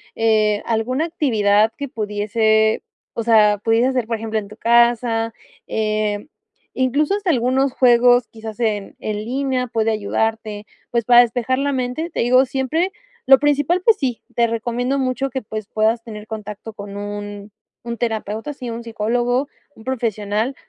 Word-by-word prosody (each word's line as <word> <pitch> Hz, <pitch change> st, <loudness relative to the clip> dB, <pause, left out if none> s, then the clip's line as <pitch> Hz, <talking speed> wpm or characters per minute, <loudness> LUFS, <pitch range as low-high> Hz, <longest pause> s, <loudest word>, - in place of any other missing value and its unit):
eh, 215 Hz, -2 st, +2 dB
alguna 235 Hz, +6 st, 0 dB
actividad 220 Hz, -10 st, +2 dB
que 280 Hz, -1 st, -5 dB
pudiese 220 Hz, -1 st, +1 dB, 0.3 s
o 230 Hz, -, -3 dB
sea, 215 Hz, -2 st, +5 dB
pudieses 230 Hz, +3 st, +3 dB
hacer, 250 Hz, -4 st, -1 dB
por 230 Hz, -, -1 dB
ejemplo, 220 Hz, 0 st, -2 dB
en 205 Hz, -, -8 dB
tu 215 Hz, -, -12 dB
casa. 235 Hz, -1 st, +2 dB, 0.3 s
Em, 215 Hz, +1 st, -1 dB, 0.4 s
incluso 275 Hz, +6 st, +1 dB
hasta 405 Hz, -3 st, -2 dB
algunos 260 Hz, -1 st, +2 dB
juegos, 245 Hz, -1 st, +5 dB
quizás 220 Hz, -1 st, -9 dB
en 210 Hz, -3 st, -1 dB
en 215 Hz, -1 st, -3 dB
línea, 260 Hz, 0 st, -1 dB
pueden 225 Hz, -1 st, 0 dB
ayudarte. 215 Hz, 0 st, -2 dB, 0.3 s
Pues 235 Hz, -1 st, +1 dB
para 240 Hz, +2 st, +6 dB
despejar 245 Hz, +2 st, 0 dB
la 280 Hz, 0 st, 0 dB
mente, 255 Hz, +6 st, -2 dB
te -, -, -3 dB
digo 255 Hz, +2 st, +4 dB
siempre, 290 Hz, +9 st, -1 dB, 0.3 s
lo 270 Hz, 0 st, +7 dB
principal, 290 Hz, +4 st, +2 dB
pues 450 Hz, 0 st, +5 dB
sí, 255 Hz, -, -2 dB
te 235 Hz, 0 st, +3 dB
recomiendo 240 Hz, +3 st, -1 dB
mucho 265 Hz, 0 st, -1 dB
que, 265 Hz, +1 st, -4 dB
pues, 215 Hz, -1 st, -6 dB
puedas 220 Hz, +2 st, +1 dB
tener 215 Hz, -2 st, -9 dB
contacto 210 Hz, 0 st, -7 dB
con 200 Hz, -1 st, -9 dB
un 205 Hz, 0 st, -6 dB, 0.3 s
un 235 Hz, 0 st, -5 dB
terapeuta. 225 Hz, +3 st, -3 dB
Sí, 255 Hz, -3 st, -7 dB
un 230 Hz, +1 st, -5 dB
psicólogo, 240 Hz, +4 st, -1 dB, 0.3 s
un 220 Hz, -, -15 dB
profesional, 220 Hz, -1 st, -2 dB
230 Hz, 155 wpm, -20 LUFS, 215-255 Hz, 0.4 s, lo